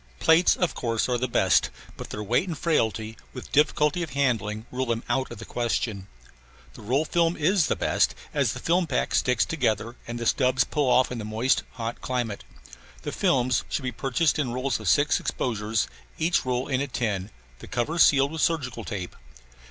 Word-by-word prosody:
Plates, 160 +2 +5
of 175 -5 0
course, 115 -2 -1
are 125 -1 0
the 130 - 0
best, 95 -6 +3 0.3
but - - -8
their 105 - -5
weight 125 - +1
and 165 -4 -4
frailty, 110 -9 0 0.2
with 125 - -9
difficulty 150 +2 +2
of 160 -6 -5
handling, 110 -6 0
rule 130 +1 -2
them 115 0 -1
out 130 +2 0
of 120 - -8
the 115 - -9
question. 110 -4 -2 0.7
The - - -12
roll 130 +9 +1
film 170 0 +1
is 170 +1 +2
the - - +1
best, - - +1 0.2
as - - +1
the - - -7
film 175 +1 +1
pack 135 - -1
sticks 125 -3 +2
together 120 -4 -1
and 120 0 -4
the 120 - -4
stubs 125 +1 +3
pull 145 -3 0
off 125 0 +4
in 125 - -4
the - - -5
moist, 110 +5 +1
hot 115 -2 -5
climate. 120 -5 -3 0.6
The - - -3
films 125 -2 +1
should 145 - -2
be 125 - -2
purchased 135 +6 0
in 130 -5 0
rolls 130 0 -1
of 110 -5 -1
six 145 +1 +3
exposures, 110 -2 -1 0.3
each 165 -4 +1
roll 125 +1 -1
in 135 -2 0
a 140 - -1
tin, 105 -7 -2 0.3
the - - -11
cover 150 +8 -2
sealed 140 -2 +5
with 160 -1 -4
surgical 130 -8 0
tape. 100 -5 -5
125 Hz, 195 wpm, -26 LUFS, 115-145 Hz, 0.7 s, Plates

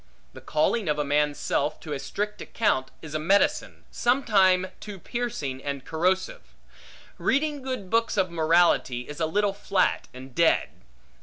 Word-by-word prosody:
The - - -11
calling 170 +5 0
of 150 - +1
a 150 - +1
man's 145 0 +1
self 145 +2 -1
to 150 - -5
a 140 - -3
strict 210 +8 -4
account, 130 -12 0
is 155 -2 -8
a 155 - -1
medicine, 195 +6 +1
sometime 200 -7 +3
too 205 -2 -8
piercing 170 - -4
and 140 -2 -4
corrosive. 185 +4 -1 0.6
Reading 290 +1 0
good 255 -8 -5
books 230 -1 +1
of 185 -3 +1
morality, 165 -6 +3
is 150 +1 -8
a 160 - +1
little 205 +4 +1
flat 200 -2 0
and 130 0 -11
dead. 170 +3 +3
175 Hz, 155 wpm, -26 LUFS, 150-210 Hz, 0.6 s, sometime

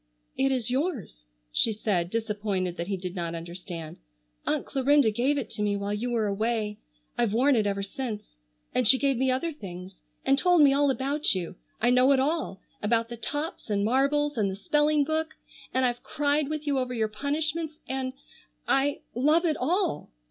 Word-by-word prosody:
"It 270 0 +2
is 245 -2 0
yours," 255 - -2 0.3
she 225 - +3
said, 200 -5 0
disappointed 205 -4 -2
that 170 0 -4
he 195 -1 -1
did 180 0 -6
not 170 -2 -3
understand. 170 -1 -7 0.5
"Aunt - - 0
Clarinda 275 -3 +3
gave 255 +7 +1
it 270 - -2
to - - -5
me 205 -1 +1
while 200 +1 -2
you 225 +4 -2
were 230 -3 +1
away. 210 +1 -1 0.4
I've 235 -4 +2
worn 265 +4 +4
it 215 -3 +2
ever 200 0 -1
since. 210 - -5 0.4
And 250 -3 +2
she 260 - +7
gave 275 0 +2
me 260 +2 +1
other 260 +6 0
things, 185 - -9 0.2
and 275 +1 +4
told 355 -2 +5
me 275 -1 +6
all 285 0 +3
about 275 -1 +1
you. 180 -1 -4 0.2
I 240 +2 +3
know 255 +2 +5
it 265 - +3
all, 285 - -1 0.2
about 230 +2 +1
the 240 - -5
tops 290 +4 -4
and 200 -1 +1
marbles, 280 +3 +2
and 200 -2 +2
the 190 - -4
spelling 295 +8 +2
book, 315 +1 -2 0.4
and 260 0 +2
I've 245 -1 -1
cried 290 0 0
with 305 -1 -3
you 280 -2 +1
over 250 -1 -2
your 220 -2 +1
punishments, 305 +6 -2
and—I—love 270 +3 -1
it 315 -3 +1
all!" 355 - 0
250 Hz, 185 wpm, -27 LUFS, 205-285 Hz, 0.5 s, she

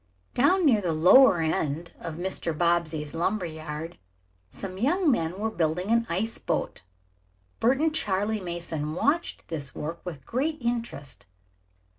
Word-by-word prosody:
Down 350 +8 +3
near 230 -8 +5
the 175 -4 0
lower 180 +7 +7
end 160 +1 -1
of 165 - -6
Mr. 175 -2 -3
Bobbsey's 165 -3 0
lumber 180 +4 0
yard 160 +1 -6 0.5
some 190 - -7
young 310 - +3
men 165 -6 -1
were 220 +2 -1
building 175 +2 -1
an 230 0 +3
ice 205 +7 -1
boat. - - -2 0.8
Bert 255 +3 +3
and 315 0 +2
Charley 210 -5 +1
Mason 170 -4 -4
watched 310 - 0
this 145 -5 -4
work 165 +3 -5
with 165 -6 -7 0.4
interest. 235 - -4
175 Hz, 135 wpm, -27 LUFS, 160-230 Hz, 0.8 s, lower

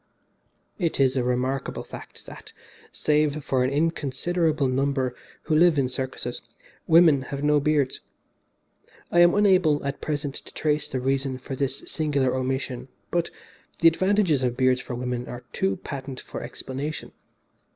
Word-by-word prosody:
"It 170 -6 0
is 130 -1 +3
a 130 - +1
remarkable 125 +2 -1
fact - - -11
that, - - -12 0.4
save 150 -1 +1
for 130 -1 +1
an 130 - +1
inconsiderable 155 +1 0
number 130 -1 0 0.3
who 155 - 0
live 165 0 +5
in 130 -2 +2
circuses, 130 -1 -4 0.5
women 160 -4 +6
have 140 +2 -5
no 150 0 +4
beards. 145 -2 +1 1.1
I 175 - +4
am 175 0 +6
unable 185 -8 +4
at 140 0 -3
present 145 -2 -2
to - - -9
trace 150 -1 0
the 130 - -3
reason 135 0 0
for 130 +1 -6
this 135 0 -1
singular 145 -5 0
omission, 130 -1 -2 0.2
but 170 -1 0 0.5
the 165 - +5
advantages 185 -3 +3
of 125 -1 -1
beards 130 -1 +3
for 125 - -6
women 125 0 -3
are 120 0 -7
too 95 0 0
patent 135 +1 -7
for - - -7
explanation. 135 +4 -5
140 Hz, 150 wpm, -25 LUFS, 130-155 Hz, 1.1 s, women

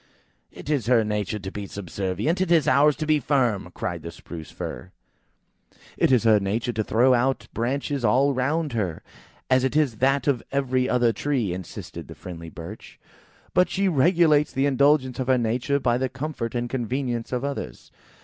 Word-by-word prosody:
"It - - -12
is 145 -6 0
her 120 -3 +4
nature 105 -1 -2
to 95 -2 -7
be 100 -1 -6
subservient, 100 - -2
it 185 -2 0
is 165 -5 +4
ours 145 +2 +5
to 155 +3 -4
be 155 -1 +3
firm! 120 -9 0
"cried 85 -2 -4
the 85 - -7
Spruce 85 -1 -10
fir. 90 - -7 1.0
"It - - +2
is 125 -3 +4
her 110 -2 +5
nature 110 +5 -2
to 110 0 -1
throw 120 +5 +3
out 130 +2 +1
branches 135 +3 -2
all 130 +6 +3
round 145 +3 -1
her, 95 -8 -2 0.4
as 130 0 +3
it 130 - 0
is 145 -8 +2
that 135 +1 +2
of 135 -5 +1
every 130 -2 0
other 120 -1 +3
tree," 125 -11 -1
insisted 90 -2 -8
the - - -10
friendly 85 -2 -9
Birch; 85 +7 -10 0.5
"but 180 0 +4
she 195 +1 0
regulates 160 -1 +3
the 135 +1 0
indulgence 140 -2 +2
of 130 - -2
her 130 -1 +4
nature 125 +4 0
by 120 -2 +1
the 130 0 -1
comfort 135 -4 -5
and 120 0 -1
convenience 120 -1 -3
of 125 +1 -2
others." 140 - -6
125 Hz, 180 wpm, -24 LUFS, 110-140 Hz, 1.0 s, ours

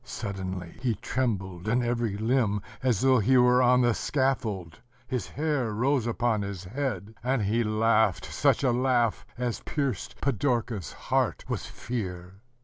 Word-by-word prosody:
Suddenly 95 -7 -5
he 120 -3 +1
trembled 95 -6 -2
in 120 +3 +2
every 120 -4 -1
limb, 110 -3 +1 0.2
as 125 -6 +1
though 130 -1 +5
he 130 +5 +4
were 125 0 +5
on 125 0 +5
the 120 -1 +3
scaffold: 110 - -1 0.3
his 125 -1 -3
hair 145 -6 -1
rose 125 +2 +1
upon 115 -2 +1
his 100 -2 -5
head,... 110 -1 -3
and 130 -2 +1
he 110 +4 +1
laughed 110 -2 +2
such - - +1
a 130 - +4
laugh 120 -2 +1
as 125 -2 -2
pierced 140 -9 -3
Pidorka's 120 - -1
heart - - -1
with - - -2
fear. 95 -5 -6
115 Hz, 145 wpm, -27 LUFS, 100-125 Hz, 0.3 s, though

